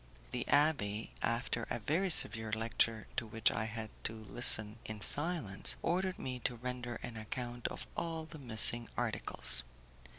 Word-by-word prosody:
The - - -3
abbé, 130 -8 +1
after 115 0 -2
a - - -2
very 160 - -1
severe 110 -9 +3
lecture 110 0 -1
to 115 - -2
which 110 0 +2
I 105 +1 -2
had 110 -1 -6
to 110 - 0
listen 110 0 +4
in 110 -1 -7
silence, 145 - +2
ordered 185 +2 -1
me 130 -1 -5
to 120 - -1
render 120 0 -6
an 120 -2 -7
account 120 +2 -5
of - - -7
all 165 -1 -4
the 160 -1 -11
missing 120 -1 +5
articles. 115 - +2
120 Hz, 155 wpm, -33 LUFS, 110-140 Hz, -, missing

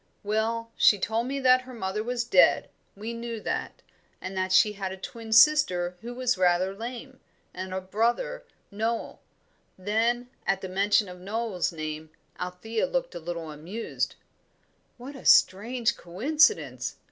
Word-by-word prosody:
"Well, 225 +2 -1
she 205 - +5
told 225 +5 -1
me 275 +1 -2
that 255 0 +5
her 255 0 -11
mother 210 0 -3
was 240 0 -1
dead 190 -6 +4 0.2
we 220 +4 -6
knew 230 -1 -5
that - - -4 0.4
and 185 +1 -6
that 185 0 -1
she 210 +2 +5
had 195 -2 -4
a 190 - -7
twin 225 +3 -8
sister 220 -8 +5
who 240 +2 -7
was 250 -5 0
rather 180 +1 +2
lame, 245 +5 -8 0.3
and 185 +1 -6
a 190 - -2
brother 240 - -1 0.3
Noel." 225 +3 -3 0.6
Then, 230 +5 0 0.2
at 195 0 +1
the 190 - -5
mention 200 +2 +2
of 180 0 -10
Noel's 205 -1 -2
name, 155 -1 -6 0.3
Althea 180 +5 -2
looked - - -2
a - - -6
little 165 -1 -5
amused. 175 +10 -4 0.8
"What 260 +4 -9
a 270 - -11
strange 230 +4 +4
coincidence!" 295 - +1
220 Hz, 150 wpm, -27 LUFS, 185-240 Hz, 0.8 s, she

